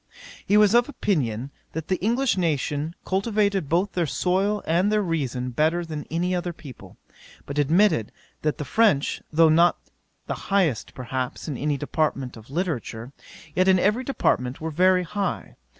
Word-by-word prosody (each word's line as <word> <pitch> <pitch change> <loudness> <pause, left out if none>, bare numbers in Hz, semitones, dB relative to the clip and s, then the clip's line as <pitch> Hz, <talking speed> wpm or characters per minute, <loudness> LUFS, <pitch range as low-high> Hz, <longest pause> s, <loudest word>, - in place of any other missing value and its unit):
'He 205 - +4
was 210 -1 +5
of 240 +3 +4
opinion, 135 - -1 0.2
that 160 0 -5
the 185 - +1
English 235 +6 +1
nation 155 -2 -1
cultivated 200 -4 0
both 180 +5 +1
their 175 -3 -1
soil 195 +7 0
and 180 +5 +2
their 210 -1 +2
reason 130 -7 -2
better 160 +7 +1
than 155 -2 -6
any 175 +3 -1
other 175 -1 -2
people: 140 -6 -13 0.5
but 140 +1 -3
admitted 160 - +3 0.3
that 150 -1 -1
the 150 - -4
French, 195 - +2
though 165 +1 +5
not 170 +3 +4 0.5
the - - -3 0.2
highest, 185 - +1
perhaps, 125 0 -4
in 150 - -3
any 145 +3 -1
department 140 -3 -2
of 110 +1 -14
literature, 140 -7 -3 0.4
yet 185 +1 +2
in 190 -1 +6
every 210 +7 +2
department 130 - 0
were 160 0 -4
very 180 +3 +3
high. 195 +2 -3
165 Hz, 160 wpm, -24 LUFS, 145-195 Hz, 0.5 s, in